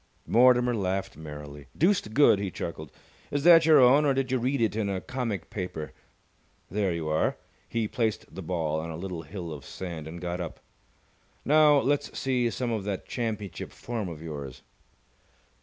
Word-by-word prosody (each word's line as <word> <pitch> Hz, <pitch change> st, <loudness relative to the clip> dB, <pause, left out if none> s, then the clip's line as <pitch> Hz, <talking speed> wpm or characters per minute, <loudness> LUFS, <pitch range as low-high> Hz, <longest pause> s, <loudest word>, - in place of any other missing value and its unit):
Mortimer 125 Hz, +1 st, +5 dB
laughed 95 Hz, -2 st, -2 dB
merrily. 75 Hz, -2 st, -9 dB
"Deuced 170 Hz, -, +2 dB
good!" 140 Hz, -8 st, +6 dB
he 100 Hz, -1 st, -2 dB
chuckled. 80 Hz, -3 st, -6 dB, 0.4 s
"Is 145 Hz, -1 st, -1 dB
that 165 Hz, -1 st, +8 dB
your 155 Hz, -, +8 dB
own 130 Hz, +4 st, +6 dB
or 140 Hz, -2 st, +2 dB
did 130 Hz, -1 st, -1 dB
you 130 Hz, -, +2 dB
read 130 Hz, +3 st, 0 dB
it 110 Hz, -2 st, +1 dB
in 110 Hz, -2 st, -1 dB
a 95 Hz, -1 st, -1 dB
comic 115 Hz, -6 st, -4 dB
paper? 90 Hz, -, -5 dB, 0.8 s
There 100 Hz, -2 st, 0 dB
you 85 Hz, -2 st, -3 dB
are!" 80 Hz, 0 st, +1 dB, 0.3 s
He 115 Hz, -2 st, -1 dB
placed 110 Hz, -3 st, -1 dB
the 95 Hz, -, -6 dB
ball 80 Hz, -3 st, -1 dB
on 80 Hz, +1 st, -5 dB
a 80 Hz, -, -5 dB
little 90 Hz, -1 st, -5 dB
hill 85 Hz, +1 st, -7 dB
of 70 Hz, -4 st, -9 dB
sand, 85 Hz, -2 st, -7 dB
and 85 Hz, +2 st, -7 dB
got 90 Hz, +1 st, -3 dB
up. 85 Hz, -, -6 dB, 0.9 s
"Now 150 Hz, 0 st, +6 dB
let's 140 Hz, +1 st, 0 dB
see 125 Hz, -3 st, +1 dB
some 120 Hz, +1 st, -2 dB
of 110 Hz, -3 st, -2 dB
that 100 Hz, -2 st, -4 dB
championship 110 Hz, -8 st, -4 dB
form 115 Hz, -6 st, -4 dB
of 80 Hz, -1 st, -8 dB
yours!" 70 Hz, -5 st, -7 dB
100 Hz, 175 wpm, -27 LUFS, 85-125 Hz, 0.9 s, that